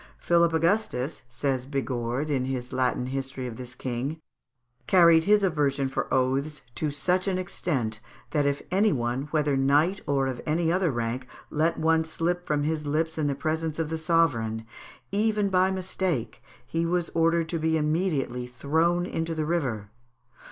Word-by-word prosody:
"Philip 170 -1 +3
Augustus," 165 - 0
says 130 0 -2
Bigord, 135 0 -2
in 130 -3 +1
his 130 -2 -4
Latin 125 -1 +1
history 135 0 -4
of 120 -2 -5
this 125 -1 -8
king, 130 +5 -3 0.7
"carried 170 -3 +6
his 205 0 +4
aversion 145 -6 +1
for 130 - -3
oaths 135 +4 0
to 155 - -1
such 180 +7 0
an 190 -2 +1
extent, 135 -11 -2 0.3
that 145 -2 +2
if 140 0 -1
any 200 +3 +4
one, 125 +1 -1
whether 150 -2 +1
knight 145 +8 +3
or 140 -1 +2
of 130 -2 -3
any 165 +2 +1
other 180 -1 +2
rank, 120 0 -2 0.2
let 160 +2 +1
one 160 0 +3
slip 170 +2 -2
from 150 -1 +1
his 150 0 -1
lips 160 +2 0
in 150 - +1
the 140 - 0
presence 160 +1 -2
of 160 -1 -2
the 160 - -1
sovereign, 130 -10 +1 0.5
even 210 0 +1
by 185 0 +4
mistake, 185 -7 -2 0.2
he 165 +1 -1
was 170 0 0
ordered 165 0 +2
to 165 - -1
be 160 0 +1
immediately 150 -6 0
thrown 160 +8 +1
into 165 -2 -3
the 155 -1 -1
river." 125 -11 -2
155 Hz, 165 wpm, -27 LUFS, 130-170 Hz, 0.7 s, carried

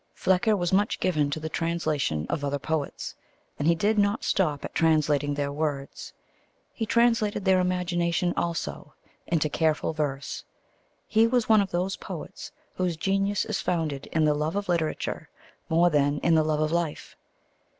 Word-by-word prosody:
Flecker 195 +3 +2
was 175 -1 -1
much 205 +3 +2
given 155 -6 +1
to 145 - -3
the 155 - -4
translation 155 - -1
of 155 -4 -2
other 145 0 0
poets, 150 0 -3 0.5
and 145 - 0
he 170 - +5
did 210 +5 +1
not 200 +2 +1
stop 155 -7 0
at - - -7
translating 150 -3 +2
their 140 0 -1
words. 145 -2 -4 0.6
He 225 - -3
translated 230 -4 +2
their 190 -1 +4
imagination 180 -1 0
also 170 -1 -3 0.3
into 155 -3 +1
careful 155 +1 0
verse. 145 -3 -3 0.6
He 225 +1 +4
was 240 -1 +1
one 220 -2 +6
of 195 - -2
those 180 +2 -1
poets - - -8 0.3
whose 180 -3 -1
genius 195 +3 0
is 215 - -2
founded 155 -6 -2
in 160 -1 +1
the 150 - +4
love 150 +4 -2
of 205 0 -2
literature 170 -3 -2 0.4
more 170 +2 +4
than 145 -1 +2
in 170 - +3
the 160 - +5
love 155 -1 0
of 155 0 +1
life. 170 -3 -2
170 Hz, 165 wpm, -26 LUFS, 150-190 Hz, 0.6 s, one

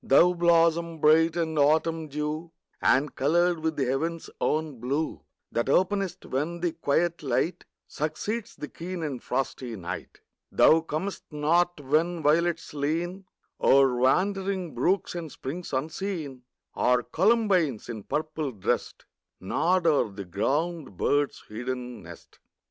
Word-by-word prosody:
Thou 175 +6 +5
blossom 170 -1 +3
bright 160 +2 +5
with 160 -3 -1
autumn 160 +2 +2
dew, 150 +3 -4 0.3
And 135 +2 +3
coloured 170 +4 +2
with 160 0 -1
the 140 -2 0
heaven's 160 +6 -2
own 155 -5 -1
blue, 140 +6 -2 0.3
That 120 +3 -1
openest 190 +3 +1
when 155 +6 -2
the 175 -1 +1
quiet 165 +2 0
light 145 +5 -1 0.2
Succeeds 205 +10 -3
the 150 - -6
keen 175 +2 -6
and 140 -5 -4
frosty 125 -2 -3
night. 90 -4 -7 0.3
Thou 160 +1 +6
comest 165 +5 -4
not 165 +3 +1
when 155 +4 0
violets 165 +3 +1
lean 170 +6 -2 0.4
O'er 135 -2 +5
wandering 185 +6 +1
brooks 175 +11 +1
and 170 -4 -5
springs 165 +9 -6
unseen, 150 -2 -4 0.3
Or 125 0 +2
columbines, 185 - +2
in 115 -3 -6
purple 155 +2 -3
dressed, 100 - -2 0.3
Nod 175 - +1
o'er 150 -8 +3
the 100 0 -7
ground 140 - -2
bird's 145 +6 0
hidden 125 +1 -5
nest. 85 -1 -13
155 Hz, 130 wpm, -27 LUFS, 135-170 Hz, 0.4 s, Thou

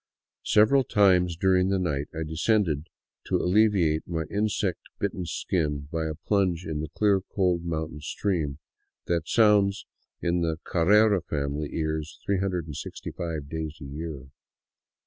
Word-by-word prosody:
Several 120 +6 +5
times 90 -6 +3
during 95 +1 +3
the 100 - +2
night 75 -6 -1
I 80 0 -4
descended 80 -1 0 0.4
to - - -1
alleviate 90 -5 +2
my 80 -2 -2
insect 105 -3 0 0.2
bitten 95 -3 -3
skin 75 -3 -2
by 80 -1 -1
a 80 - -4
plunge 90 -1 0
in 80 -2 -3
the 80 - -5
clear, 100 -2 +2
cold 90 -3 0
mountain 80 -2 -3
stream 80 -4 -2 0.5
that 85 -2 -1
sounds 105 -3 +3 0.3
in 85 0 0
the 80 -1 0
Carrera 100 +3 +4
family 75 -1 -3
ears 80 -1 -3
365 85 -4 -3
days 80 0 -5
a 75 - -9
year. 70 -1 -7
85 Hz, 130 wpm, -26 LUFS, 80-100 Hz, 0.5 s, Several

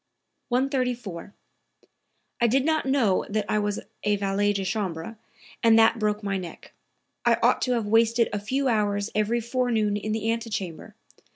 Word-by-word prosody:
134. 250 - -2 1.1
"I 235 - +5
did 265 +4 +2
not 315 -3 +1
know 250 -9 +2
that 210 0 -1
I 215 - +1
was 205 0 -1 0.2
a 210 0 +2
valet 200 +1 +1
de 195 -1 -2
chambre, 190 -1 -3 0.5
and 225 -1 +5
that 225 +1 +5
broke 210 0 -1
my 195 -1 -1
neck. 175 -2 -10 0.5
I - - +3
ought - - +3
to 250 - +1
have 230 -3 -1
wasted 230 +2 +3
a 205 - -1
few 265 +7 -1
hours 205 -3 0
every 215 +3 +1
forenoon 235 -3 0
in 210 +1 -3
the 220 +1 0
antechamber. 210 -7 -5
215 Hz, 160 wpm, -25 LUFS, 205-235 Hz, 1.1 s, I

